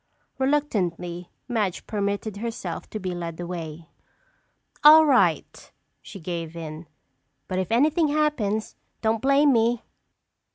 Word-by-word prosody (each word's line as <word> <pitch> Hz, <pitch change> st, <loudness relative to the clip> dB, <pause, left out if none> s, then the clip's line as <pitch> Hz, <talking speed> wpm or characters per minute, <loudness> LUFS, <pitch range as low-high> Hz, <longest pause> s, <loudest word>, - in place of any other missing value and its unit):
Reluctantly, 180 Hz, -, -1 dB, 0.2 s
Madge 215 Hz, -7 st, -1 dB
permitted 205 Hz, 0 st, -2 dB
herself 230 Hz, +2 st, -5 dB
to 215 Hz, -, -5 dB
be 185 Hz, -2 st, -3 dB
led 170 Hz, -1 st, -6 dB
away. 170 Hz, -2 st, -6 dB, 1.0 s
"All 310 Hz, +1 st, +9 dB
right," 275 Hz, -4 st, +1 dB, 0.3 s
she 200 Hz, -, -10 dB
gave 170 Hz, -1 st, -5 dB
in, 160 Hz, 0 st, -7 dB, 0.6 s
"but 185 Hz, -1 st, -2 dB
if 185 Hz, -, -3 dB
anything 305 Hz, +7 st, +3 dB
happens, 285 Hz, -9 st, 0 dB, 0.3 s
don't 220 Hz, 0 st, +1 dB
blame 275 Hz, +1 st, +4 dB
me!" 235 Hz, 0 st, +2 dB
210 Hz, 115 wpm, -25 LUFS, 175-265 Hz, 1.0 s, All